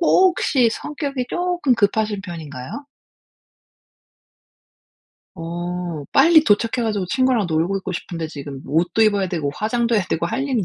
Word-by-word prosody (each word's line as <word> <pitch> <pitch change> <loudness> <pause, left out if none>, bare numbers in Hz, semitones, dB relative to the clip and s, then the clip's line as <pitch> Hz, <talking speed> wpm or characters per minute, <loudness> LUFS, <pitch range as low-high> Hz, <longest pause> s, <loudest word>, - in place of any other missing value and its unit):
혹시 335 -9 +3
성격이 280 -1 -4
쪼끔 350 -7 +1
급하신 210 -1 +1
편인가요? 160 - -8 2.5
어 175 -2 -5
빨리 325 -1 +6
도착해 230 +2 +2
가지고 210 -4 -1
친구랑 255 0 +1
놀고 165 +5 0
있고 190 -1 -5
싶은데 170 -2 -5
지금 140 -3 -8
옷도 175 +7 0
입어야 205 -3 +2
되고 160 -5 -2
화장도 235 +4 0
해야 210 - +3
되고 165 +1 0
할 265 - -2
일이 260 -7 0
205 Hz, 295 characters per minute, -21 LUFS, 170-255 Hz, 2.5 s, 빨리